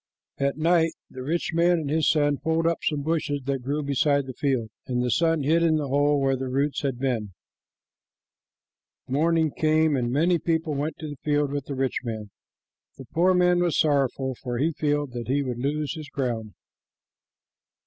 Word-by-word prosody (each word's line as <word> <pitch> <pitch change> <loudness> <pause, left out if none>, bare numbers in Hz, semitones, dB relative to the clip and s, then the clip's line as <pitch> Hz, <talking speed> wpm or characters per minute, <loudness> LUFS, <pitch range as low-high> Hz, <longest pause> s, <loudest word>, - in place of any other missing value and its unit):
At 140 +1 0
night 165 0 +3 0.2
the 130 - -8
rich 160 +6 -1
man 170 +1 +3
and 155 -3 -3
his 160 0 +2
son 145 -2 +2
pulled 160 0 0
up 165 0 +1
some 145 -2 -1
bushes 150 -2 -1
that 135 -1 -1
grew 145 +4 -2
beside 140 0 +1
the 130 - -7
field, 125 -5 -1 0.2
and 125 -1 0
the 125 - 0
son 165 +2 +2
hid 160 +4 +3
in 165 -2 +3
the 150 -3 -1
hole 145 +1 +3
where 135 -1 +2
their 130 0 -4
roots 140 +3 0
had 135 -4 -2
been. 115 -7 -2 1.7
Morning 160 +3 +2
came, 155 0 +2
and 120 -2 -1
many 170 +6 +2
people 160 -2 -1
went 145 +3 -3
to 155 - -6
the 145 - -7
field 145 -1 +1
with 145 -1 -3
the 140 - -5
rich 130 0 -1
man. 110 -4 -5 0.7
The 135 - -10
poor 180 +3 +3
man 180 0 +4
was 175 -3 +1
sorrowful, 135 -3 +1
for 120 -2 -3
he 155 +6 +1
feared 145 -2 -1
that 120 -1 -6
he 140 +3 +1
would 125 -3 -4
lose 145 +3 -1
his 155 -3 -8
ground. 115 -6 -3
145 Hz, 190 wpm, -25 LUFS, 130-160 Hz, 1.7 s, man